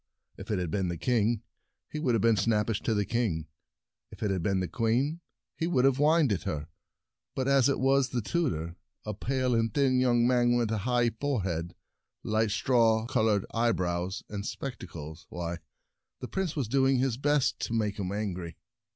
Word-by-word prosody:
If -, -, -10 dB
it 105 Hz, -, +1 dB
had 90 Hz, -3 st, -2 dB
been 95 Hz, 0 st, 0 dB
the 85 Hz, -1 st, -3 dB
king, 115 Hz, +1 st, +1 dB, 0.5 s
he 155 Hz, -, -4 dB
would 130 Hz, -6 st, +1 dB
have 110 Hz, -, 0 dB
been 115 Hz, -1 st, +5 dB
snappish 105 Hz, +1 st, +1 dB
to 110 Hz, -, 0 dB
the 105 Hz, -1 st, +1 dB
king; 100 Hz, -8 st, -1 dB, 0.6 s
if -, -, -9 dB
it 105 Hz, -, +1 dB
had 95 Hz, -2 st, -1 dB
been 95 Hz, +2 st, +1 dB
the 90 Hz, -, -1 dB
queen, 125 Hz, -, 0 dB, 0.3 s
he 165 Hz, -, -1 dB
would 130 Hz, -7 st, +2 dB
have 135 Hz, -1 st, +4 dB
whined 150 Hz, -2 st, +4 dB
at 95 Hz, -, -2 dB
her; 75 Hz, +1 st, -4 dB, 0.7 s
but 130 Hz, 0 st, -1 dB
as 140 Hz, -1 st, +4 dB
it 140 Hz, -, 0 dB
was 135 Hz, 0 st, +3 dB
the 125 Hz, -, -1 dB
tutor— 85 Hz, -, -1 dB, 0.3 s
a 105 Hz, -, -3 dB
pale 130 Hz, +4 st, -1 dB
and 115 Hz, -1 st, +1 dB
thin 130 Hz, 0 st, +2 dB
young 120 Hz, -2 st, +3 dB
man 120 Hz, -1 st, +3 dB
with 120 Hz, -2 st, +1 dB
a 110 Hz, -, 0 dB
high 120 Hz, -1 st, +3 dB
forehead, 95 Hz, -, -2 dB, 0.5 s
light 110 Hz, 0 st, +1 dB
straw 115 Hz, 0 st, +3 dB
colored 110 Hz, -4 st, +1 dB
eyebrows, 95 Hz, -5 st, 0 dB
and 100 Hz, -1 st, -5 dB
spectacles 85 Hz, -, -7 dB
— -, -, -52 dB
why, 85 Hz, 0 st, -4 dB, 0.6 s
the 125 Hz, -, -6 dB
Prince 190 Hz, 0 st, -2 dB
was 140 Hz, -7 st, -1 dB
doing 135 Hz, +2 st, +3 dB
his 125 Hz, -2 st, 0 dB
best 145 Hz, 0 st, +1 dB
to -, -, -3 dB
make 105 Hz, -2 st, -1 dB
him 95 Hz, -1 st, -2 dB
angry. 95 Hz, -5 st, -4 dB
115 Hz, 190 wpm, -29 LUFS, 95-130 Hz, 0.7 s, been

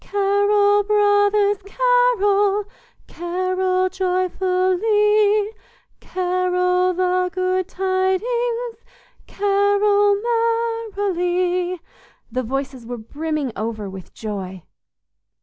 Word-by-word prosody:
"Carol, 405 Hz, +1 st, +2 dB
brothers, 410 Hz, 0 st, +2 dB
carol, 415 Hz, -3 st, +2 dB, 0.4 s
Carol 370 Hz, +2 st, -1 dB
joyfully, 380 Hz, +3 st, +1 dB, 0.5 s
Carol 360 Hz, 0 st, 0 dB
the 365 Hz, 0 st, +1 dB
good 370 Hz, 0 st, -1 dB
tidings, 450 Hz, +6 st, -1 dB, 0.4 s
Carol 405 Hz, 0 st, +2 dB, 0.8 s
merrily!" 360 Hz, -2 st, -1 dB, 0.5 s
The 255 Hz, +2 st, -1 dB
voices 265 Hz, +1 st, -4 dB
were 245 Hz, +1 st, -6 dB
brimming 295 Hz, +4 st, -4 dB
over 215 Hz, -1 st, -4 dB
with 190 Hz, -1 st, -10 dB
joy. 190 Hz, -4 st, -6 dB
375 Hz, 70 wpm, -21 LUFS, 360-410 Hz, 0.8 s, Carol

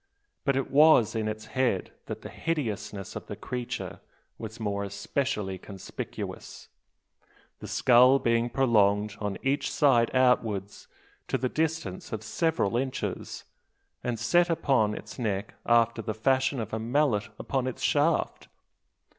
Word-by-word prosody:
But 140 Hz, -, +2 dB
it 135 Hz, -, -1 dB
was 145 Hz, -5 st, +6 dB
in 110 Hz, -2 st, -1 dB
its 110 Hz, 0 st, -4 dB
head 125 Hz, -8 st, 0 dB, 0.2 s
that -, -, -6 dB
the -, -, -7 dB
hideousness 105 Hz, -, -3 dB
of -, -, -7 dB
the -, -, -5 dB
creature 125 Hz, -1 st, -5 dB, 0.4 s
was 110 Hz, 0 st, -7 dB
more 100 Hz, -2 st, -2 dB
especially 100 Hz, 0 st, -2 dB
conspicuous; 95 Hz, 0 st, -7 dB, 0.9 s
the -, -, -8 dB
skull 125 Hz, +1 st, +5 dB
being 115 Hz, -2 st, +1 dB
prolonged 105 Hz, -5 st, +2 dB
on 105 Hz, -2 st, -3 dB
each 135 Hz, +2 st, 0 dB
side 120 Hz, -5 st, +4 dB
outwards 110 Hz, -6 st, +1 dB, 0.4 s
to -, -, 0 dB
the 130 Hz, 0 st, -1 dB
distance 160 Hz, -, -2 dB
of 110 Hz, -1 st, -4 dB
several 120 Hz, -, 0 dB
inches, 130 Hz, +1 st, -3 dB, 0.6 s
and 120 Hz, -2 st, -1 dB
set 175 Hz, +10 st, +3 dB
upon 125 Hz, -10 st, +2 dB
its -, -, -9 dB
neck 105 Hz, -3 st, -2 dB
after 115 Hz, -1 st, +3 dB
the 110 Hz, -1 st, -4 dB
fashion 130 Hz, +3 st, +1 dB
of 110 Hz, -2 st, -5 dB
a 110 Hz, -, -1 dB
mallet 115 Hz, -3 st, +1 dB
upon 130 Hz, -1 st, -2 dB
its 130 Hz, -, -5 dB
shaft! 150 Hz, +3 st, +1 dB
115 Hz, 140 wpm, -28 LUFS, 105-135 Hz, 0.9 s, was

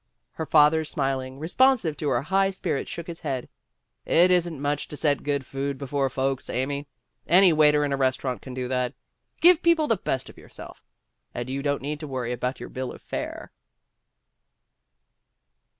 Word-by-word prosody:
Her 160 Hz, -, -5 dB
father 155 Hz, +1 st, +5 dB
smiling, 135 Hz, -3 st, -2 dB
responsive 180 Hz, -, +2 dB
to 150 Hz, -, -1 dB
her 125 Hz, -1 st, +1 dB
high 195 Hz, +5 st, +2 dB
spirits, 185 Hz, -7 st, -3 dB
shook 170 Hz, -, -6 dB
his 170 Hz, -1 st, -7 dB
head. 130 Hz, -2 st, -3 dB, 0.6 s
"It 180 Hz, +2 st, +4 dB
isn't 175 Hz, -4 st, +1 dB
much 145 Hz, +1 st, -1 dB
to 150 Hz, -, -8 dB
set 145 Hz, -2 st, +1 dB
good 140 Hz, -2 st, -2 dB
food 135 Hz, +2 st, -3 dB
before 140 Hz, 0 st, -1 dB
folks, 135 Hz, 0 st, -2 dB
Amy. 140 Hz, +3 st, -2 dB, 0.4 s
Any 180 Hz, +1 st, +6 dB
waiter 150 Hz, -1 st, +4 dB
in 140 Hz, -, -1 dB
a -, -, 0 dB
restaurant 130 Hz, -3 st, -1 dB
can 130 Hz, -2 st, -9 dB
do 130 Hz, -1 st, -3 dB
that. 125 Hz, -1 st, -1 dB, 0.5 s
Give 350 Hz, 0 st, +7 dB
people 335 Hz, -2 st, +3 dB
the 225 Hz, -7 st, +1 dB
best 130 Hz, -7 st, -3 dB
of -, -, -13 dB
yourself -, -, -11 dB, 0.5 s
and 120 Hz, 0 st, -4 dB
you 135 Hz, +1 st, -2 dB
don't 145 Hz, -1 st, -1 dB
need 150 Hz, +1 st, -3 dB
to 155 Hz, -, -6 dB
worry 130 Hz, -3 st, -3 dB
about 125 Hz, +1 st, -3 dB
your -, -, -8 dB
bill 130 Hz, -1 st, -5 dB
of -, -, -11 dB
fare." -, -, -5 dB
145 Hz, 175 wpm, -25 LUFS, 130-160 Hz, 0.6 s, Give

